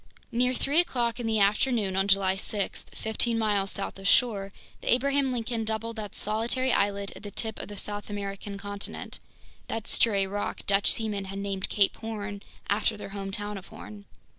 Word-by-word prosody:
Near 250 +2 +3
three 285 +6 +3
o'clock 240 -8 +1
in 235 - -2
the 220 -1 +2
afternoon 205 0 +3
on 195 +1 +2
July 195 -1 +4
6, 200 +1 -2
fifteen 225 +1 0
miles 205 -3 +2
south 195 0 -4
of 195 - -2
shore, 200 -4 +3 0.3
the - - 0
Abraham 275 +2 +3
Lincoln 235 -1 -1
doubled 220 +1 -2
that 210 -2 -6
solitary 235 +5 +1
islet 200 0 +1
at - - -10
the 205 - -6
tip 220 +2 -4
of - - -6
the 205 - -8
South 205 +1 -4
American 200 0 -4
continent, 200 0 -5 0.5
that 225 -1 -3
stray 200 -5 +3
rock 205 +2 -3
Dutch 200 0 +4
seamen 210 -3 -1
had 195 +1 -6
named 195 -1 0
Cape 200 -2 +3
Horn 210 -3 -5 0.3
after 210 +1 +1
their 205 - -7
hometown 200 +1 -3
of 190 - -15
Hoorn. 205 -1 -10
205 Hz, 180 wpm, -28 LUFS, 200-225 Hz, 0.5 s, July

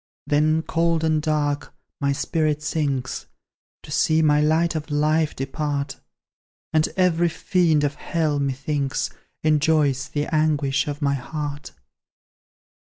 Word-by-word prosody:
Then, 155 +2 +2
cold 165 0 +1
and 155 -1 +2
dark, 150 -2 -1 0.2
my 140 -1 +1
spirit 150 +1 0
sinks, 140 -5 -2 0.6
To - - -11
see 160 0 +3
my 150 -1 +4
light 160 +3 +2
of 155 -1 -4
life 150 +1 +1
depart; 140 +1 -3 0.7
And 155 0 +3
every 175 -2 +3
fiend 165 -3 +2
of 145 0 +1
Hell, 155 -1 -1
methinks, 140 0 -1 0.3
Enjoys 150 -3 +2
the 145 0 -1
anguish 145 -3 +1
of 145 0 -4
my 140 0 +2
heart. 145 +2 -5
150 Hz, 120 wpm, -23 LUFS, 145-160 Hz, 0.7 s, my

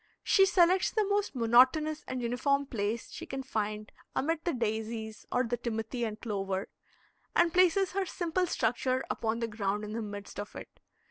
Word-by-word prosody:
She 390 -1 +5
selects 365 0 +4
the 430 -2 +1
most 405 -5 0
monotonous 260 +7 +4
and 255 -1 -3
uniform 280 +4 +1
place 225 -3 -3
she - - -7
can 270 0 -4
find 215 -4 -3 0.2
amid 325 +4 0
the 345 - +1
daisies 220 -1 -3
or 250 - +2
the 240 0 -1
timothy 235 +1 -3
and 215 -1 -5
clover, 195 -3 -3 0.7
and 335 -1 +4
places 370 +1 +4
her 385 0 -1
simple 350 +1 -1
structure 255 0 0
upon 225 +1 -1
the 230 - 0
ground 210 -1 -2
in 210 0 -5
the 230 - -2
midst 205 -1 -7
of 205 - -6
it. - - -10
240 Hz, 175 wpm, -30 LUFS, 220-320 Hz, 0.7 s, She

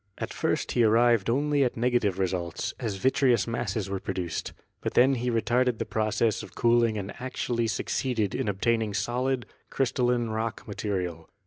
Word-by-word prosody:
At - - -4
first - - -1
he 120 - +3
arrived 115 -1 +4
only 145 +3 +2
at 125 - -1
negative 120 -5 +1
results, 90 -2 -2
as 110 -5 -2
vitreous 130 +1 +3
masses 110 -4 -2
were 95 0 -3
produced; 90 -4 -3 0.3
but - - -3
he - - +9
then 135 +1 +3
retarded 120 0 +1
the - - -2
process 110 0 0
of - - -11
cooling 115 -2 +3
and 100 0 -5
actually 120 -2 -2
succeeded 110 -1 -1
in - - -2
obtaining 110 +1 0
solid, 125 +1 -1 0.2
crystalline 125 -2 +1
rock 110 +1 -3
material. 90 -6 -3
115 Hz, 155 wpm, -27 LUFS, 100-125 Hz, 0.3 s, he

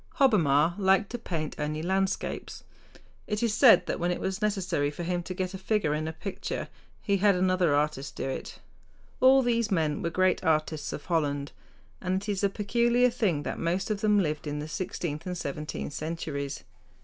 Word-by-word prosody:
Hobbema 170 - +4
liked 195 0 +3
to 240 - -4
paint 160 -8 -4
only 150 +1 -2
landscapes. 190 +2 -2 0.6
It 210 +2 -1
is 230 -3 +2
said 225 -5 +7
that - - -3
when 175 +1 0
it 180 - -1
was 190 0 -3
necessary 185 -8 0
for 150 +4 -6
him 175 +1 -1
to 185 +1 -6
get 185 +1 -3
a 190 - -6
figure 195 -6 0
in 155 +1 -2
a - - -2
picture 185 +5 -5 0.3
he 200 -2 +2
had 200 0 +4
another 180 -4 +2
artist 145 -4 -1
do - - -3
it. 135 - -5 0.6
All 265 +1 +6
these 235 -2 +1
men 160 -6 0
were 170 - -1
great 185 +2 +1
artists 155 -1 0
of 145 - -6
Holland. 145 -4 -1 0.5
And 190 +1 -1
it 210 - -6
is 200 -1 -1
a 200 - +4
peculiar 235 +4 +2
thing 190 -11 0
that - - -4
most 175 +5 -1
of 210 -1 -2
them 210 -1 +3
lived 155 -5 0
in 145 0 -3
the 150 +1 -4
sixteenth 170 -2 -4
and 180 0 -3
seventeenth 150 -1 -5
centuries. 150 -3 -4
180 Hz, 190 wpm, -28 LUFS, 155-200 Hz, 0.6 s, said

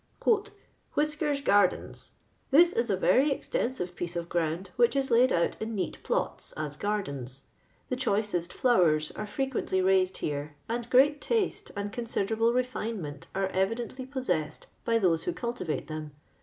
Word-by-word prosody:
" 415 -1 -31
Whiskefs 295 -1 +1
gardens, 205 -7 +1 0.2
— - - -39
This 340 +6 +6
is 235 0 0
a 195 - +2
very 270 +9 +4
extensive 235 -9 -2
piece 175 -1 -4
of 170 0 -3
ground, 170 +2 -1
which 240 +2 +3
is 270 -1 0
laid 245 +2 +5
out 170 - +1
in 220 0 -3
neat 190 - -3
plots, - - -1
as 150 -1 -4
gardens. 140 -10 -3 0.5
The 255 - 0
choicest 205 -8 0
flowers 165 -11 +3
are 215 - -6
frequently 265 -4 -1
raided 185 0 +3
here, 145 0 -3
and 235 +1 -3
great 285 +4 +5
taste 450 -4 -1
and 200 0 -3
considerable 230 -1 0
re 250 +1 +2
finement 210 - -5
are 195 0 0
evidently 230 +7 -2
possessed 215 - -2 0.2
by 230 -1 +3
those 175 -6 +2
who 355 - -1
cultivate 235 - -3
them. 155 -2 -6
210 Hz, 155 wpm, -29 LUFS, 175-255 Hz, 0.5 s, This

